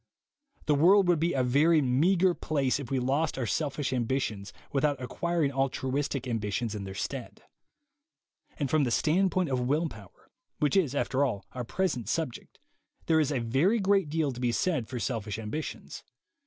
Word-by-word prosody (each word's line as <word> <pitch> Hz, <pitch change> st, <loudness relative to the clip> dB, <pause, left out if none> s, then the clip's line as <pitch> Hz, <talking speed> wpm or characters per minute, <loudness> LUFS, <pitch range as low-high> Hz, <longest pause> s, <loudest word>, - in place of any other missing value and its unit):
The 150 Hz, -, +3 dB
world 180 Hz, +6 st, +5 dB
would 175 Hz, -3 st, +3 dB
be 170 Hz, +2 st, +1 dB
a 130 Hz, -, +1 dB
very 150 Hz, +6 st, +4 dB
meagre 170 Hz, +8 st, +3 dB
place 140 Hz, -5 st, 0 dB
if 135 Hz, -4 st, -7 dB
we 135 Hz, -, 0 dB
lost 135 Hz, +5 st, 0 dB
our 130 Hz, -, -1 dB
selfish 140 Hz, -, -1 dB
ambitions 115 Hz, -5 st, -2 dB, 0.2 s
without 145 Hz, -1 st, +1 dB
acquiring 160 Hz, +3 st, -1 dB
altruistic 135 Hz, 0 st, -1 dB
ambitions 110 Hz, -1 st, -2 dB
in 105 Hz, -2 st, -5 dB
their 95 Hz, 0 st, -7 dB
stead. -, -, -5 dB, 1.1 s
And 145 Hz, -, -1 dB
from 155 Hz, +2 st, +2 dB
the 125 Hz, -, 0 dB
standpoint 180 Hz, +5 st, +2 dB
of 130 Hz, -2 st, 0 dB
will 145 Hz, +7 st, +1 dB
power, 105 Hz, -6 st, -15 dB, 0.3 s
which 150 Hz, +5 st, +1 dB
is, 155 Hz, -8 st, +2 dB
after 140 Hz, 0 st, +1 dB
all, 115 Hz, -8 st, -2 dB
our 125 Hz, -, -5 dB
present 125 Hz, -, -2 dB
subject, 160 Hz, -8 st, -3 dB, 0.5 s
there 160 Hz, -1 st, +3 dB
is 150 Hz, -2 st, +1 dB
a 140 Hz, -, 0 dB
very 135 Hz, -, +2 dB
great 195 Hz, -4 st, +2 dB
deal 155 Hz, -2 st, 0 dB
to 125 Hz, -, -8 dB
be 125 Hz, -1 st, +1 dB
said 145 Hz, -3 st, 0 dB
for 125 Hz, -, -5 dB
selfish 110 Hz, -2 st, -3 dB
ambitions. 115 Hz, +8 st, -6 dB
140 Hz, 170 wpm, -29 LUFS, 125-160 Hz, 1.1 s, world